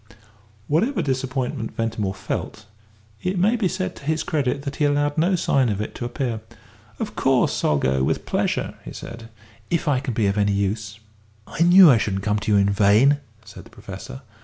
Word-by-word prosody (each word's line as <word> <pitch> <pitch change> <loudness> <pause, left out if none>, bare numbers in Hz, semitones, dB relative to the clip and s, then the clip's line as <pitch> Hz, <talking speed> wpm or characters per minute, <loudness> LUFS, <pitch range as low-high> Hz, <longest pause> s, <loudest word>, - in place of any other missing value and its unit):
Whatever 185 - +1
disappointment 130 -4 -3
Ventimore 110 -4 -2
felt, 105 - -5 0.6
it 185 +1 -2
may 205 +7 +3
be 220 -5 +1
said 185 0 -3
to - - -13
his 155 +1 0
credit 140 -2 -1
that 140 0 -5
he 150 - +2
allowed 145 0 +1
no 175 +4 +2
sign 135 -7 +2
of 100 -2 -2
it 105 - -4
to 120 - -5
appear. 120 -3 -3 0.6
"Of - - -5
course - - +1
I'll 75 - +3
go, 65 -1 +1
with - - -1
pleasure," - - -1
he - - -9
said, 115 0 -9 0.4
"if 170 -1 -1
I 140 -3 +2
can 125 -3 -4
be 110 - +1
of 100 +1 +1
any 100 0 +2
use." 100 +1 -2 0.5
"I - - -6
knew 175 -1 +8
I 115 - +4
shouldn't 95 -2 -2
come 105 0 0
to 105 - -2
you 105 - +5
in 100 0 +3
vain," 105 +8 +4 0.3
said 105 - -12
the - - -17
Professor. 100 +7 -10
125 Hz, 195 wpm, -22 LUFS, 105-155 Hz, 0.6 s, knew